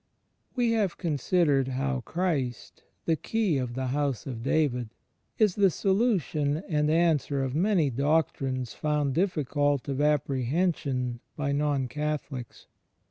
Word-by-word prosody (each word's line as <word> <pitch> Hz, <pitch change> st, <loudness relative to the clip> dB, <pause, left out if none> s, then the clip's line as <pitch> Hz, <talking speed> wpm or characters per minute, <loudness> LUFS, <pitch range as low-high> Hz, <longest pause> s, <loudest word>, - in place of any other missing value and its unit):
We 240 Hz, -2 st, +2 dB
have 210 Hz, -6 st, 0 dB
considered 150 Hz, -3 st, +1 dB
how 135 Hz, 0 st, -1 dB
Christ, 145 Hz, -8 st, -2 dB, 0.2 s
the 165 Hz, -, +2 dB
Key 180 Hz, -1 st, 0 dB
of 125 Hz, -2 st, -3 dB
the 130 Hz, 0 st, -2 dB
House 140 Hz, -1 st, -1 dB
of 125 Hz, -4 st, -5 dB
David, 125 Hz, -3 st, +1 dB, 0.5 s
is 210 Hz, -4 st, +4 dB
the 200 Hz, -1 st, +4 dB
solution 185 Hz, -, +1 dB
and 150 Hz, -4 st, +1 dB
answer 155 Hz, -4 st, +2 dB
of 130 Hz, -1 st, -2 dB
many 170 Hz, -3 st, +2 dB
doctrines 135 Hz, -2 st, 0 dB
foujid 150 Hz, -2 st, 0 dB
difficult 145 Hz, -5 st, 0 dB
of 140 Hz, 0 st, -1 dB
apprehension 140 Hz, -3 st, 0 dB, 0.2 s
by 140 Hz, -1 st, -1 dB
Non 140 Hz, -2 st, 0 dB
Catholics. 150 Hz, -3 st, -4 dB
145 Hz, 125 wpm, -28 LUFS, 135-165 Hz, 0.5 s, is